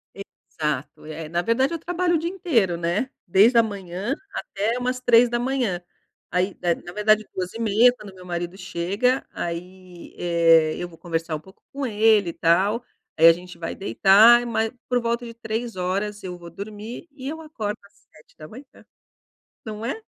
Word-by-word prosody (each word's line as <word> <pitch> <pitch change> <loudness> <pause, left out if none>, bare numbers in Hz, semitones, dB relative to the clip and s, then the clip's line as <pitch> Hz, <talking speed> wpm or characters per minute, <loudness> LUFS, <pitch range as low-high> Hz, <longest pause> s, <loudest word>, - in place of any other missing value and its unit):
Exato. 150 -8 -5
Eh, 155 0 -7
na 170 +2 0
verdade 260 - +1
eu 335 - -3
trabalho 350 +1 0
o - - +4
dia 330 +2 -2
inteiro, 260 - +1
né? 175 +9 -1 0.2
Desde 205 +7 +5
a 230 - +7
manhã, 200 +1 -4 0.2
até 215 +5 -2
umas 250 0 -2
3h. 240 -4 +2 0.5
Aí, 180 +2 -1
eh, 175 -1 +2
na 175 - -11
verdade 215 +1 +3
2:30h, 220 +5 +3
quando 210 -5 -12
o - - -19
meu 180 -1 -13
marido 175 +1 -4
chega, 200 +8 -1
aí, 180 +1 -7
eh, 165 -2 +4
eu 175 - -4
vou 165 - -16
conversar 165 -1 -3
um - - -5
pouco 190 +5 -19
com 280 0 -3
ele 215 -4 +3
e - - -5
tal, 195 +8 +2 0.3
aí 165 +1 +8
a 165 - +9
gente 180 +1 -11
vai 165 -1 -5
deitar, 215 +5 +6
ma 230 -2 0 0.3
por 250 -1 +1
volta 235 +1 -1
de 230 - -8
3h 230 0 -4 0.5
eu 180 -1 -6
vou 170 -1 -11
dormir 210 - -8
e 270 -2 -9
eu 320 +3 -5
acordo 220 -9 -4
às 200 - -22 0.2
7h. 155 - -13 1.0
Não 215 0 -6
é? 275 - -3
205 Hz, 170 wpm, -23 LUFS, 175-240 Hz, 1.0 s, a